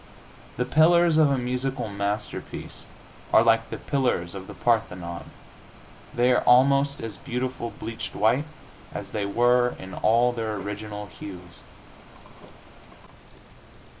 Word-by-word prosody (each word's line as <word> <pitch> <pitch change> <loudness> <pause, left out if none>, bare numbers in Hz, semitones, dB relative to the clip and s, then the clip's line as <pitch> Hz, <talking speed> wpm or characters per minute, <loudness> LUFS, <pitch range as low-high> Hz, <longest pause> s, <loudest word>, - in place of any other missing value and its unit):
The 125 - 0
pillars 160 +3 +4
of 155 -2 +5
a 140 - +1
musical 125 0 -2
masterpiece 100 +1 -5 0.4
are 110 - +6
like 115 0 +3
the - - -5
pillars 125 - -1
of 95 -1 -8
the - - -9
Parthenon; 90 -8 -1 0.9
they 125 +1 +2
are 125 - +3
almost 140 +3 +4
as 115 -2 -6
beautiful 125 -1 -4
bleached 115 +1 -7
white 120 +8 +2 0.5
as - - -6
they 105 -2 -2
were 120 +3 +3
in 95 0 -9
all 120 +3 +3
their 110 -3 -3
original 105 +1 -6
hues. 90 -3 -11
115 Hz, 120 wpm, -25 LUFS, 105-125 Hz, 0.9 s, are